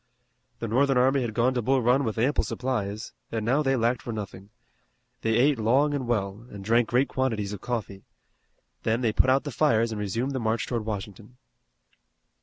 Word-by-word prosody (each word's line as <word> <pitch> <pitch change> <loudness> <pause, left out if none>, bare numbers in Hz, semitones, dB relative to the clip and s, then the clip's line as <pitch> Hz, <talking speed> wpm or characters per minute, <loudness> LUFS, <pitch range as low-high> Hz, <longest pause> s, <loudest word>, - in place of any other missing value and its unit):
The 115 - -4
Northern 135 +4 +2
army 130 +2 +3
had 115 -3 -3
gone 125 +2 +2
to 125 - 0
Bull 130 +2 +1
Run 125 +4 +3
with 110 -3 -3
ample 130 +6 +2
supplies, 110 -5 -3 0.2
and 110 -2 -2
now 135 +6 +2
they 135 -2 +2
lacked 120 0 +1
for 120 - -5
nothing. 100 -2 -7 0.7
They 115 0 +1
ate 135 +2 +3
long 135 +7 +3
and 135 -4 -2
well, 105 -1 -2
and 100 -1 -9
drank 115 +2 +3
great 125 +3 +2
quantities 110 -6 -1
of 100 - -7
coffee. 110 -5 -4 0.8
Then 115 +2 0
they 115 -3 +1
put 130 - +3
out 135 +1 +3
the 145 - -5
fires 115 -5 +2
and 105 -1 -4
resumed 115 +7 -2
the 130 - -2
march 110 -1 0
toward 115 -3 -3
Washington. 105 +2 -6
115 Hz, 195 wpm, -26 LUFS, 110-130 Hz, 0.8 s, army